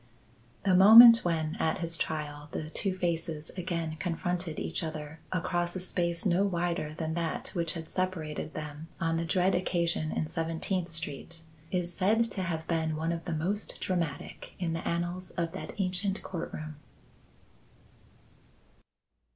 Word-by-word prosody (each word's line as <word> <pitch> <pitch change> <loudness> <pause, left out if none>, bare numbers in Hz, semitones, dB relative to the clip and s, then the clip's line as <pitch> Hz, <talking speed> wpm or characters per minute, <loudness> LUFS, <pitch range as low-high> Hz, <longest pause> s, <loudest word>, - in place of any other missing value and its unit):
The 195 -2 +3
moment 230 +5 +11
when, 160 -2 0
at 160 +4 +1
his 170 -2 -2
trial, 150 -2 -3
the 155 0 -4
two 190 +1 -2
faces 165 -3 -2
again 170 -3 -3
confronted 175 -1 -2
each - - -2
other 155 -1 -5
across 175 0 0
a - - -2
space 170 -1 -1
no 185 0 +3
wider 175 -4 -1
than 160 -1 -2
that 165 -1 -2
which 170 -3 -1
had 165 -2 -6
separated 160 -5 -3
them 150 +1 -6
on 165 0 +1
the 165 - -1
dread 180 +3 +2
occasion 170 -3 0
in - - -1
Seventeenth 165 +3 -2
Street, 160 0 -5 0.3
is 175 -1 -1
said 210 +6 +3
to 195 - -3
have 165 -3 -3
been 160 -2 0
one 160 +2 -1
of 170 -1 -4
the 170 -3 -2
most 195 +7 -2
dramatic 170 -6 -3
in 170 -3 -1
the 165 - -3
annals 175 +2 -2
of 170 -1 0
that 190 - -7
ancient 190 +1 0
court 170 -3 -5
room. 155 -1 -7
170 Hz, 150 wpm, -30 LUFS, 160-180 Hz, 0.3 s, moment